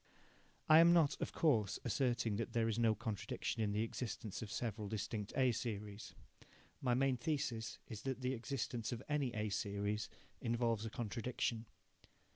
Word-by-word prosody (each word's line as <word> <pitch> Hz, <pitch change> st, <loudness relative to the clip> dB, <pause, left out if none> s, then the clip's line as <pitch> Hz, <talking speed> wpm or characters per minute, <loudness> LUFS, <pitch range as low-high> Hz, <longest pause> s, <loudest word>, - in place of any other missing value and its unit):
I 155 Hz, +1 st, +9 dB
am 170 Hz, +1 st, +8 dB
not, 165 Hz, -5 st, +5 dB
of -, -, -1 dB
course, 115 Hz, -, +2 dB
asserting 120 Hz, -5 st, +1 dB
that 115 Hz, -, -3 dB
there 115 Hz, -1 st, +2 dB
is 115 Hz, 0 st, 0 dB
no 115 Hz, -2 st, +4 dB
contradiction 110 Hz, +1 st, -3 dB
in 105 Hz, -2 st, +1 dB
the 105 Hz, +2 st, +1 dB
existence 110 Hz, -3 st, -4 dB
of 105 Hz, -2 st, -5 dB
several 110 Hz, -3 st, -2 dB
distinct 105 Hz, 0 st, -3 dB
A 130 Hz, -2 st, +5 dB
series. 105 Hz, -3 st, -4 dB, 0.7 s
My 125 Hz, -2 st, +2 dB
main 135 Hz, 0 st, +3 dB
thesis 120 Hz, -5 st, -2 dB
is 105 Hz, -2 st, -6 dB
that 130 Hz, 0 st, -3 dB
the 125 Hz, +1 st, 0 dB
existence 120 Hz, -2 st, -3 dB
of 120 Hz, -, -4 dB
any 145 Hz, -4 st, +1 dB
A 105 Hz, 0 st, 0 dB
series 100 Hz, +1 st, -1 dB, 0.3 s
involves 115 Hz, -2 st, +1 dB
a -, -, -4 dB
contradiction. 115 Hz, 0 st, -2 dB
115 Hz, 160 wpm, -38 LUFS, 105-125 Hz, 0.7 s, I